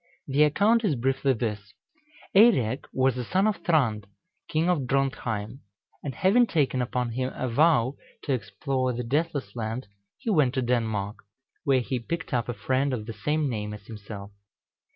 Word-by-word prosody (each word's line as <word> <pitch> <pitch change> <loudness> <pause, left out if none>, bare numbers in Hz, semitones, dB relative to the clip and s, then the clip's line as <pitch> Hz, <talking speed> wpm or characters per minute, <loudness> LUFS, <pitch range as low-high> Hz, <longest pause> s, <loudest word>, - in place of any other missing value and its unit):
The 140 +1 +2
account 205 +10 +4
is 180 -9 +2
briefly 135 +2 +1
this: 105 -4 -4 0.6
Eirek 140 - +5
was 130 -1 +1
a - - -2
son 185 - +1
of 215 -4 +1
Thrand, 130 - +1 0.4
king 160 +2 +1
of 155 -8 +1
Drontheim, 125 -4 -1 0.4
and 140 -3 -4
having 230 +6 +4
taken 140 -7 +1
upon 125 -1 -1
him 130 +2 -2
a 130 - -2
vow 135 0 +3 0.3
to 140 - 0
explore 130 +4 -1
the 120 +1 -3
Deathless 140 -4 -1
Land, 115 +2 -3 0.3
he 225 - -2
went 145 -8 +3
to 130 - +1
Denmark, 110 -4 -1 0.5
where 135 -3 +4
he 125 +1 -2
picked 165 +6 -4
up 120 -1 0
a 120 - -2
friend 130 +5 0
of 110 -4 -3
the 115 - -6
same 150 +9 0
name 105 -4 -3
as 105 - -13
himself. 105 -2 -9
130 Hz, 170 wpm, -27 LUFS, 115-150 Hz, 0.6 s, Eirek